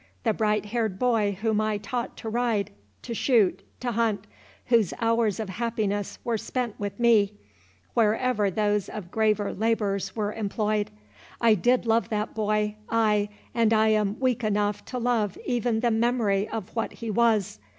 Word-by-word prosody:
The 225 - +2
bright 210 -1 +1
haired 220 -3 -1
boy 215 -4 +1
whom 220 -2 +2
I 215 -1 0
taught 235 +4 -4
to 225 - -5
ride, 230 -3 0 0.3
to 235 - -5
shoot, 225 -5 +2 0.2
to 245 -1 -1
hunt—whose 220 -1 -1
hours 230 -3 +1
of 220 - -3
happiness 210 -1 -2
were 230 -2 -1
spent 245 -2 -3
with 205 +3 -4
me, 215 -4 +4 0.6
wherever 220 -1 +2
those 205 0 0
of 190 -4 -7
graver 215 -2 +1
labours 210 -2 -1
were 210 -1 -1
employed—I 210 - -1
did 245 +5 +2
love 230 0 +2
that 210 0 -2
boy—ay, 210 0 0 0.2
and 230 -1 +3
I 220 0 +4
am 210 -1 +1
weak 255 -3 +1
enough 205 -1 0
to 255 - -5
love 230 -5 0
even 240 -2 0
the 240 -1 +2
memory 220 -3 +1
of 220 -2 -6
what 225 - -2
he 230 -2 -5
was. 215 - +2
215 Hz, 150 wpm, -26 LUFS, 205-230 Hz, 0.6 s, me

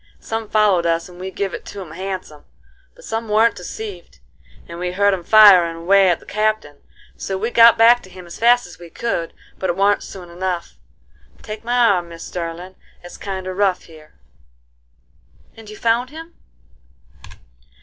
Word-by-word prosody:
Some 225 -1 -5
followed 200 -5 +2
us 165 0 0
and 180 -1 -15
we 190 +1 -5
give 195 -1 -4
it - - -7
to 205 - -9
'em 180 -5 -9
handsome. 185 -4 -7 0.5
But - - -17
some 225 0 -4
warn't 220 +2 +3
deceived, 180 - -9 0.5
and 170 0 -9
we 180 0 -3
heard 200 +1 +2
'em 180 -2 -4
firin' 190 -5 +6
away 190 +3 +3
at 175 - +1
the - - -19
Captain; 215 -9 -2 0.4
so 195 - -4
we 225 +5 -3
got 235 0 +7
back 235 +2 +6
to 190 - -15
him 185 -1 -12
as 170 - -11
fast 240 +1 +4
as 175 - -14
we 170 -1 -12
could, 170 -3 -3 0.3
but 190 - -2
it 175 - 0
warn't 200 +1 +2
soon 180 -3 -10
enough.—Take 185 +4 -8
my 240 +2 -1
arm, 200 -8 +2
Mis' 165 0 -9
Sterlin': 175 +1 -6 0.3
it's 175 - -11
kinder 190 -2 -5
rough 190 -1 0
here." 155 -2 -17 1.4
"And 225 -2 -13
you 215 - -10
found 235 +2 0
him?" 325 +3 -11
190 Hz, 170 wpm, -19 LUFS, 175-220 Hz, 1.4 s, got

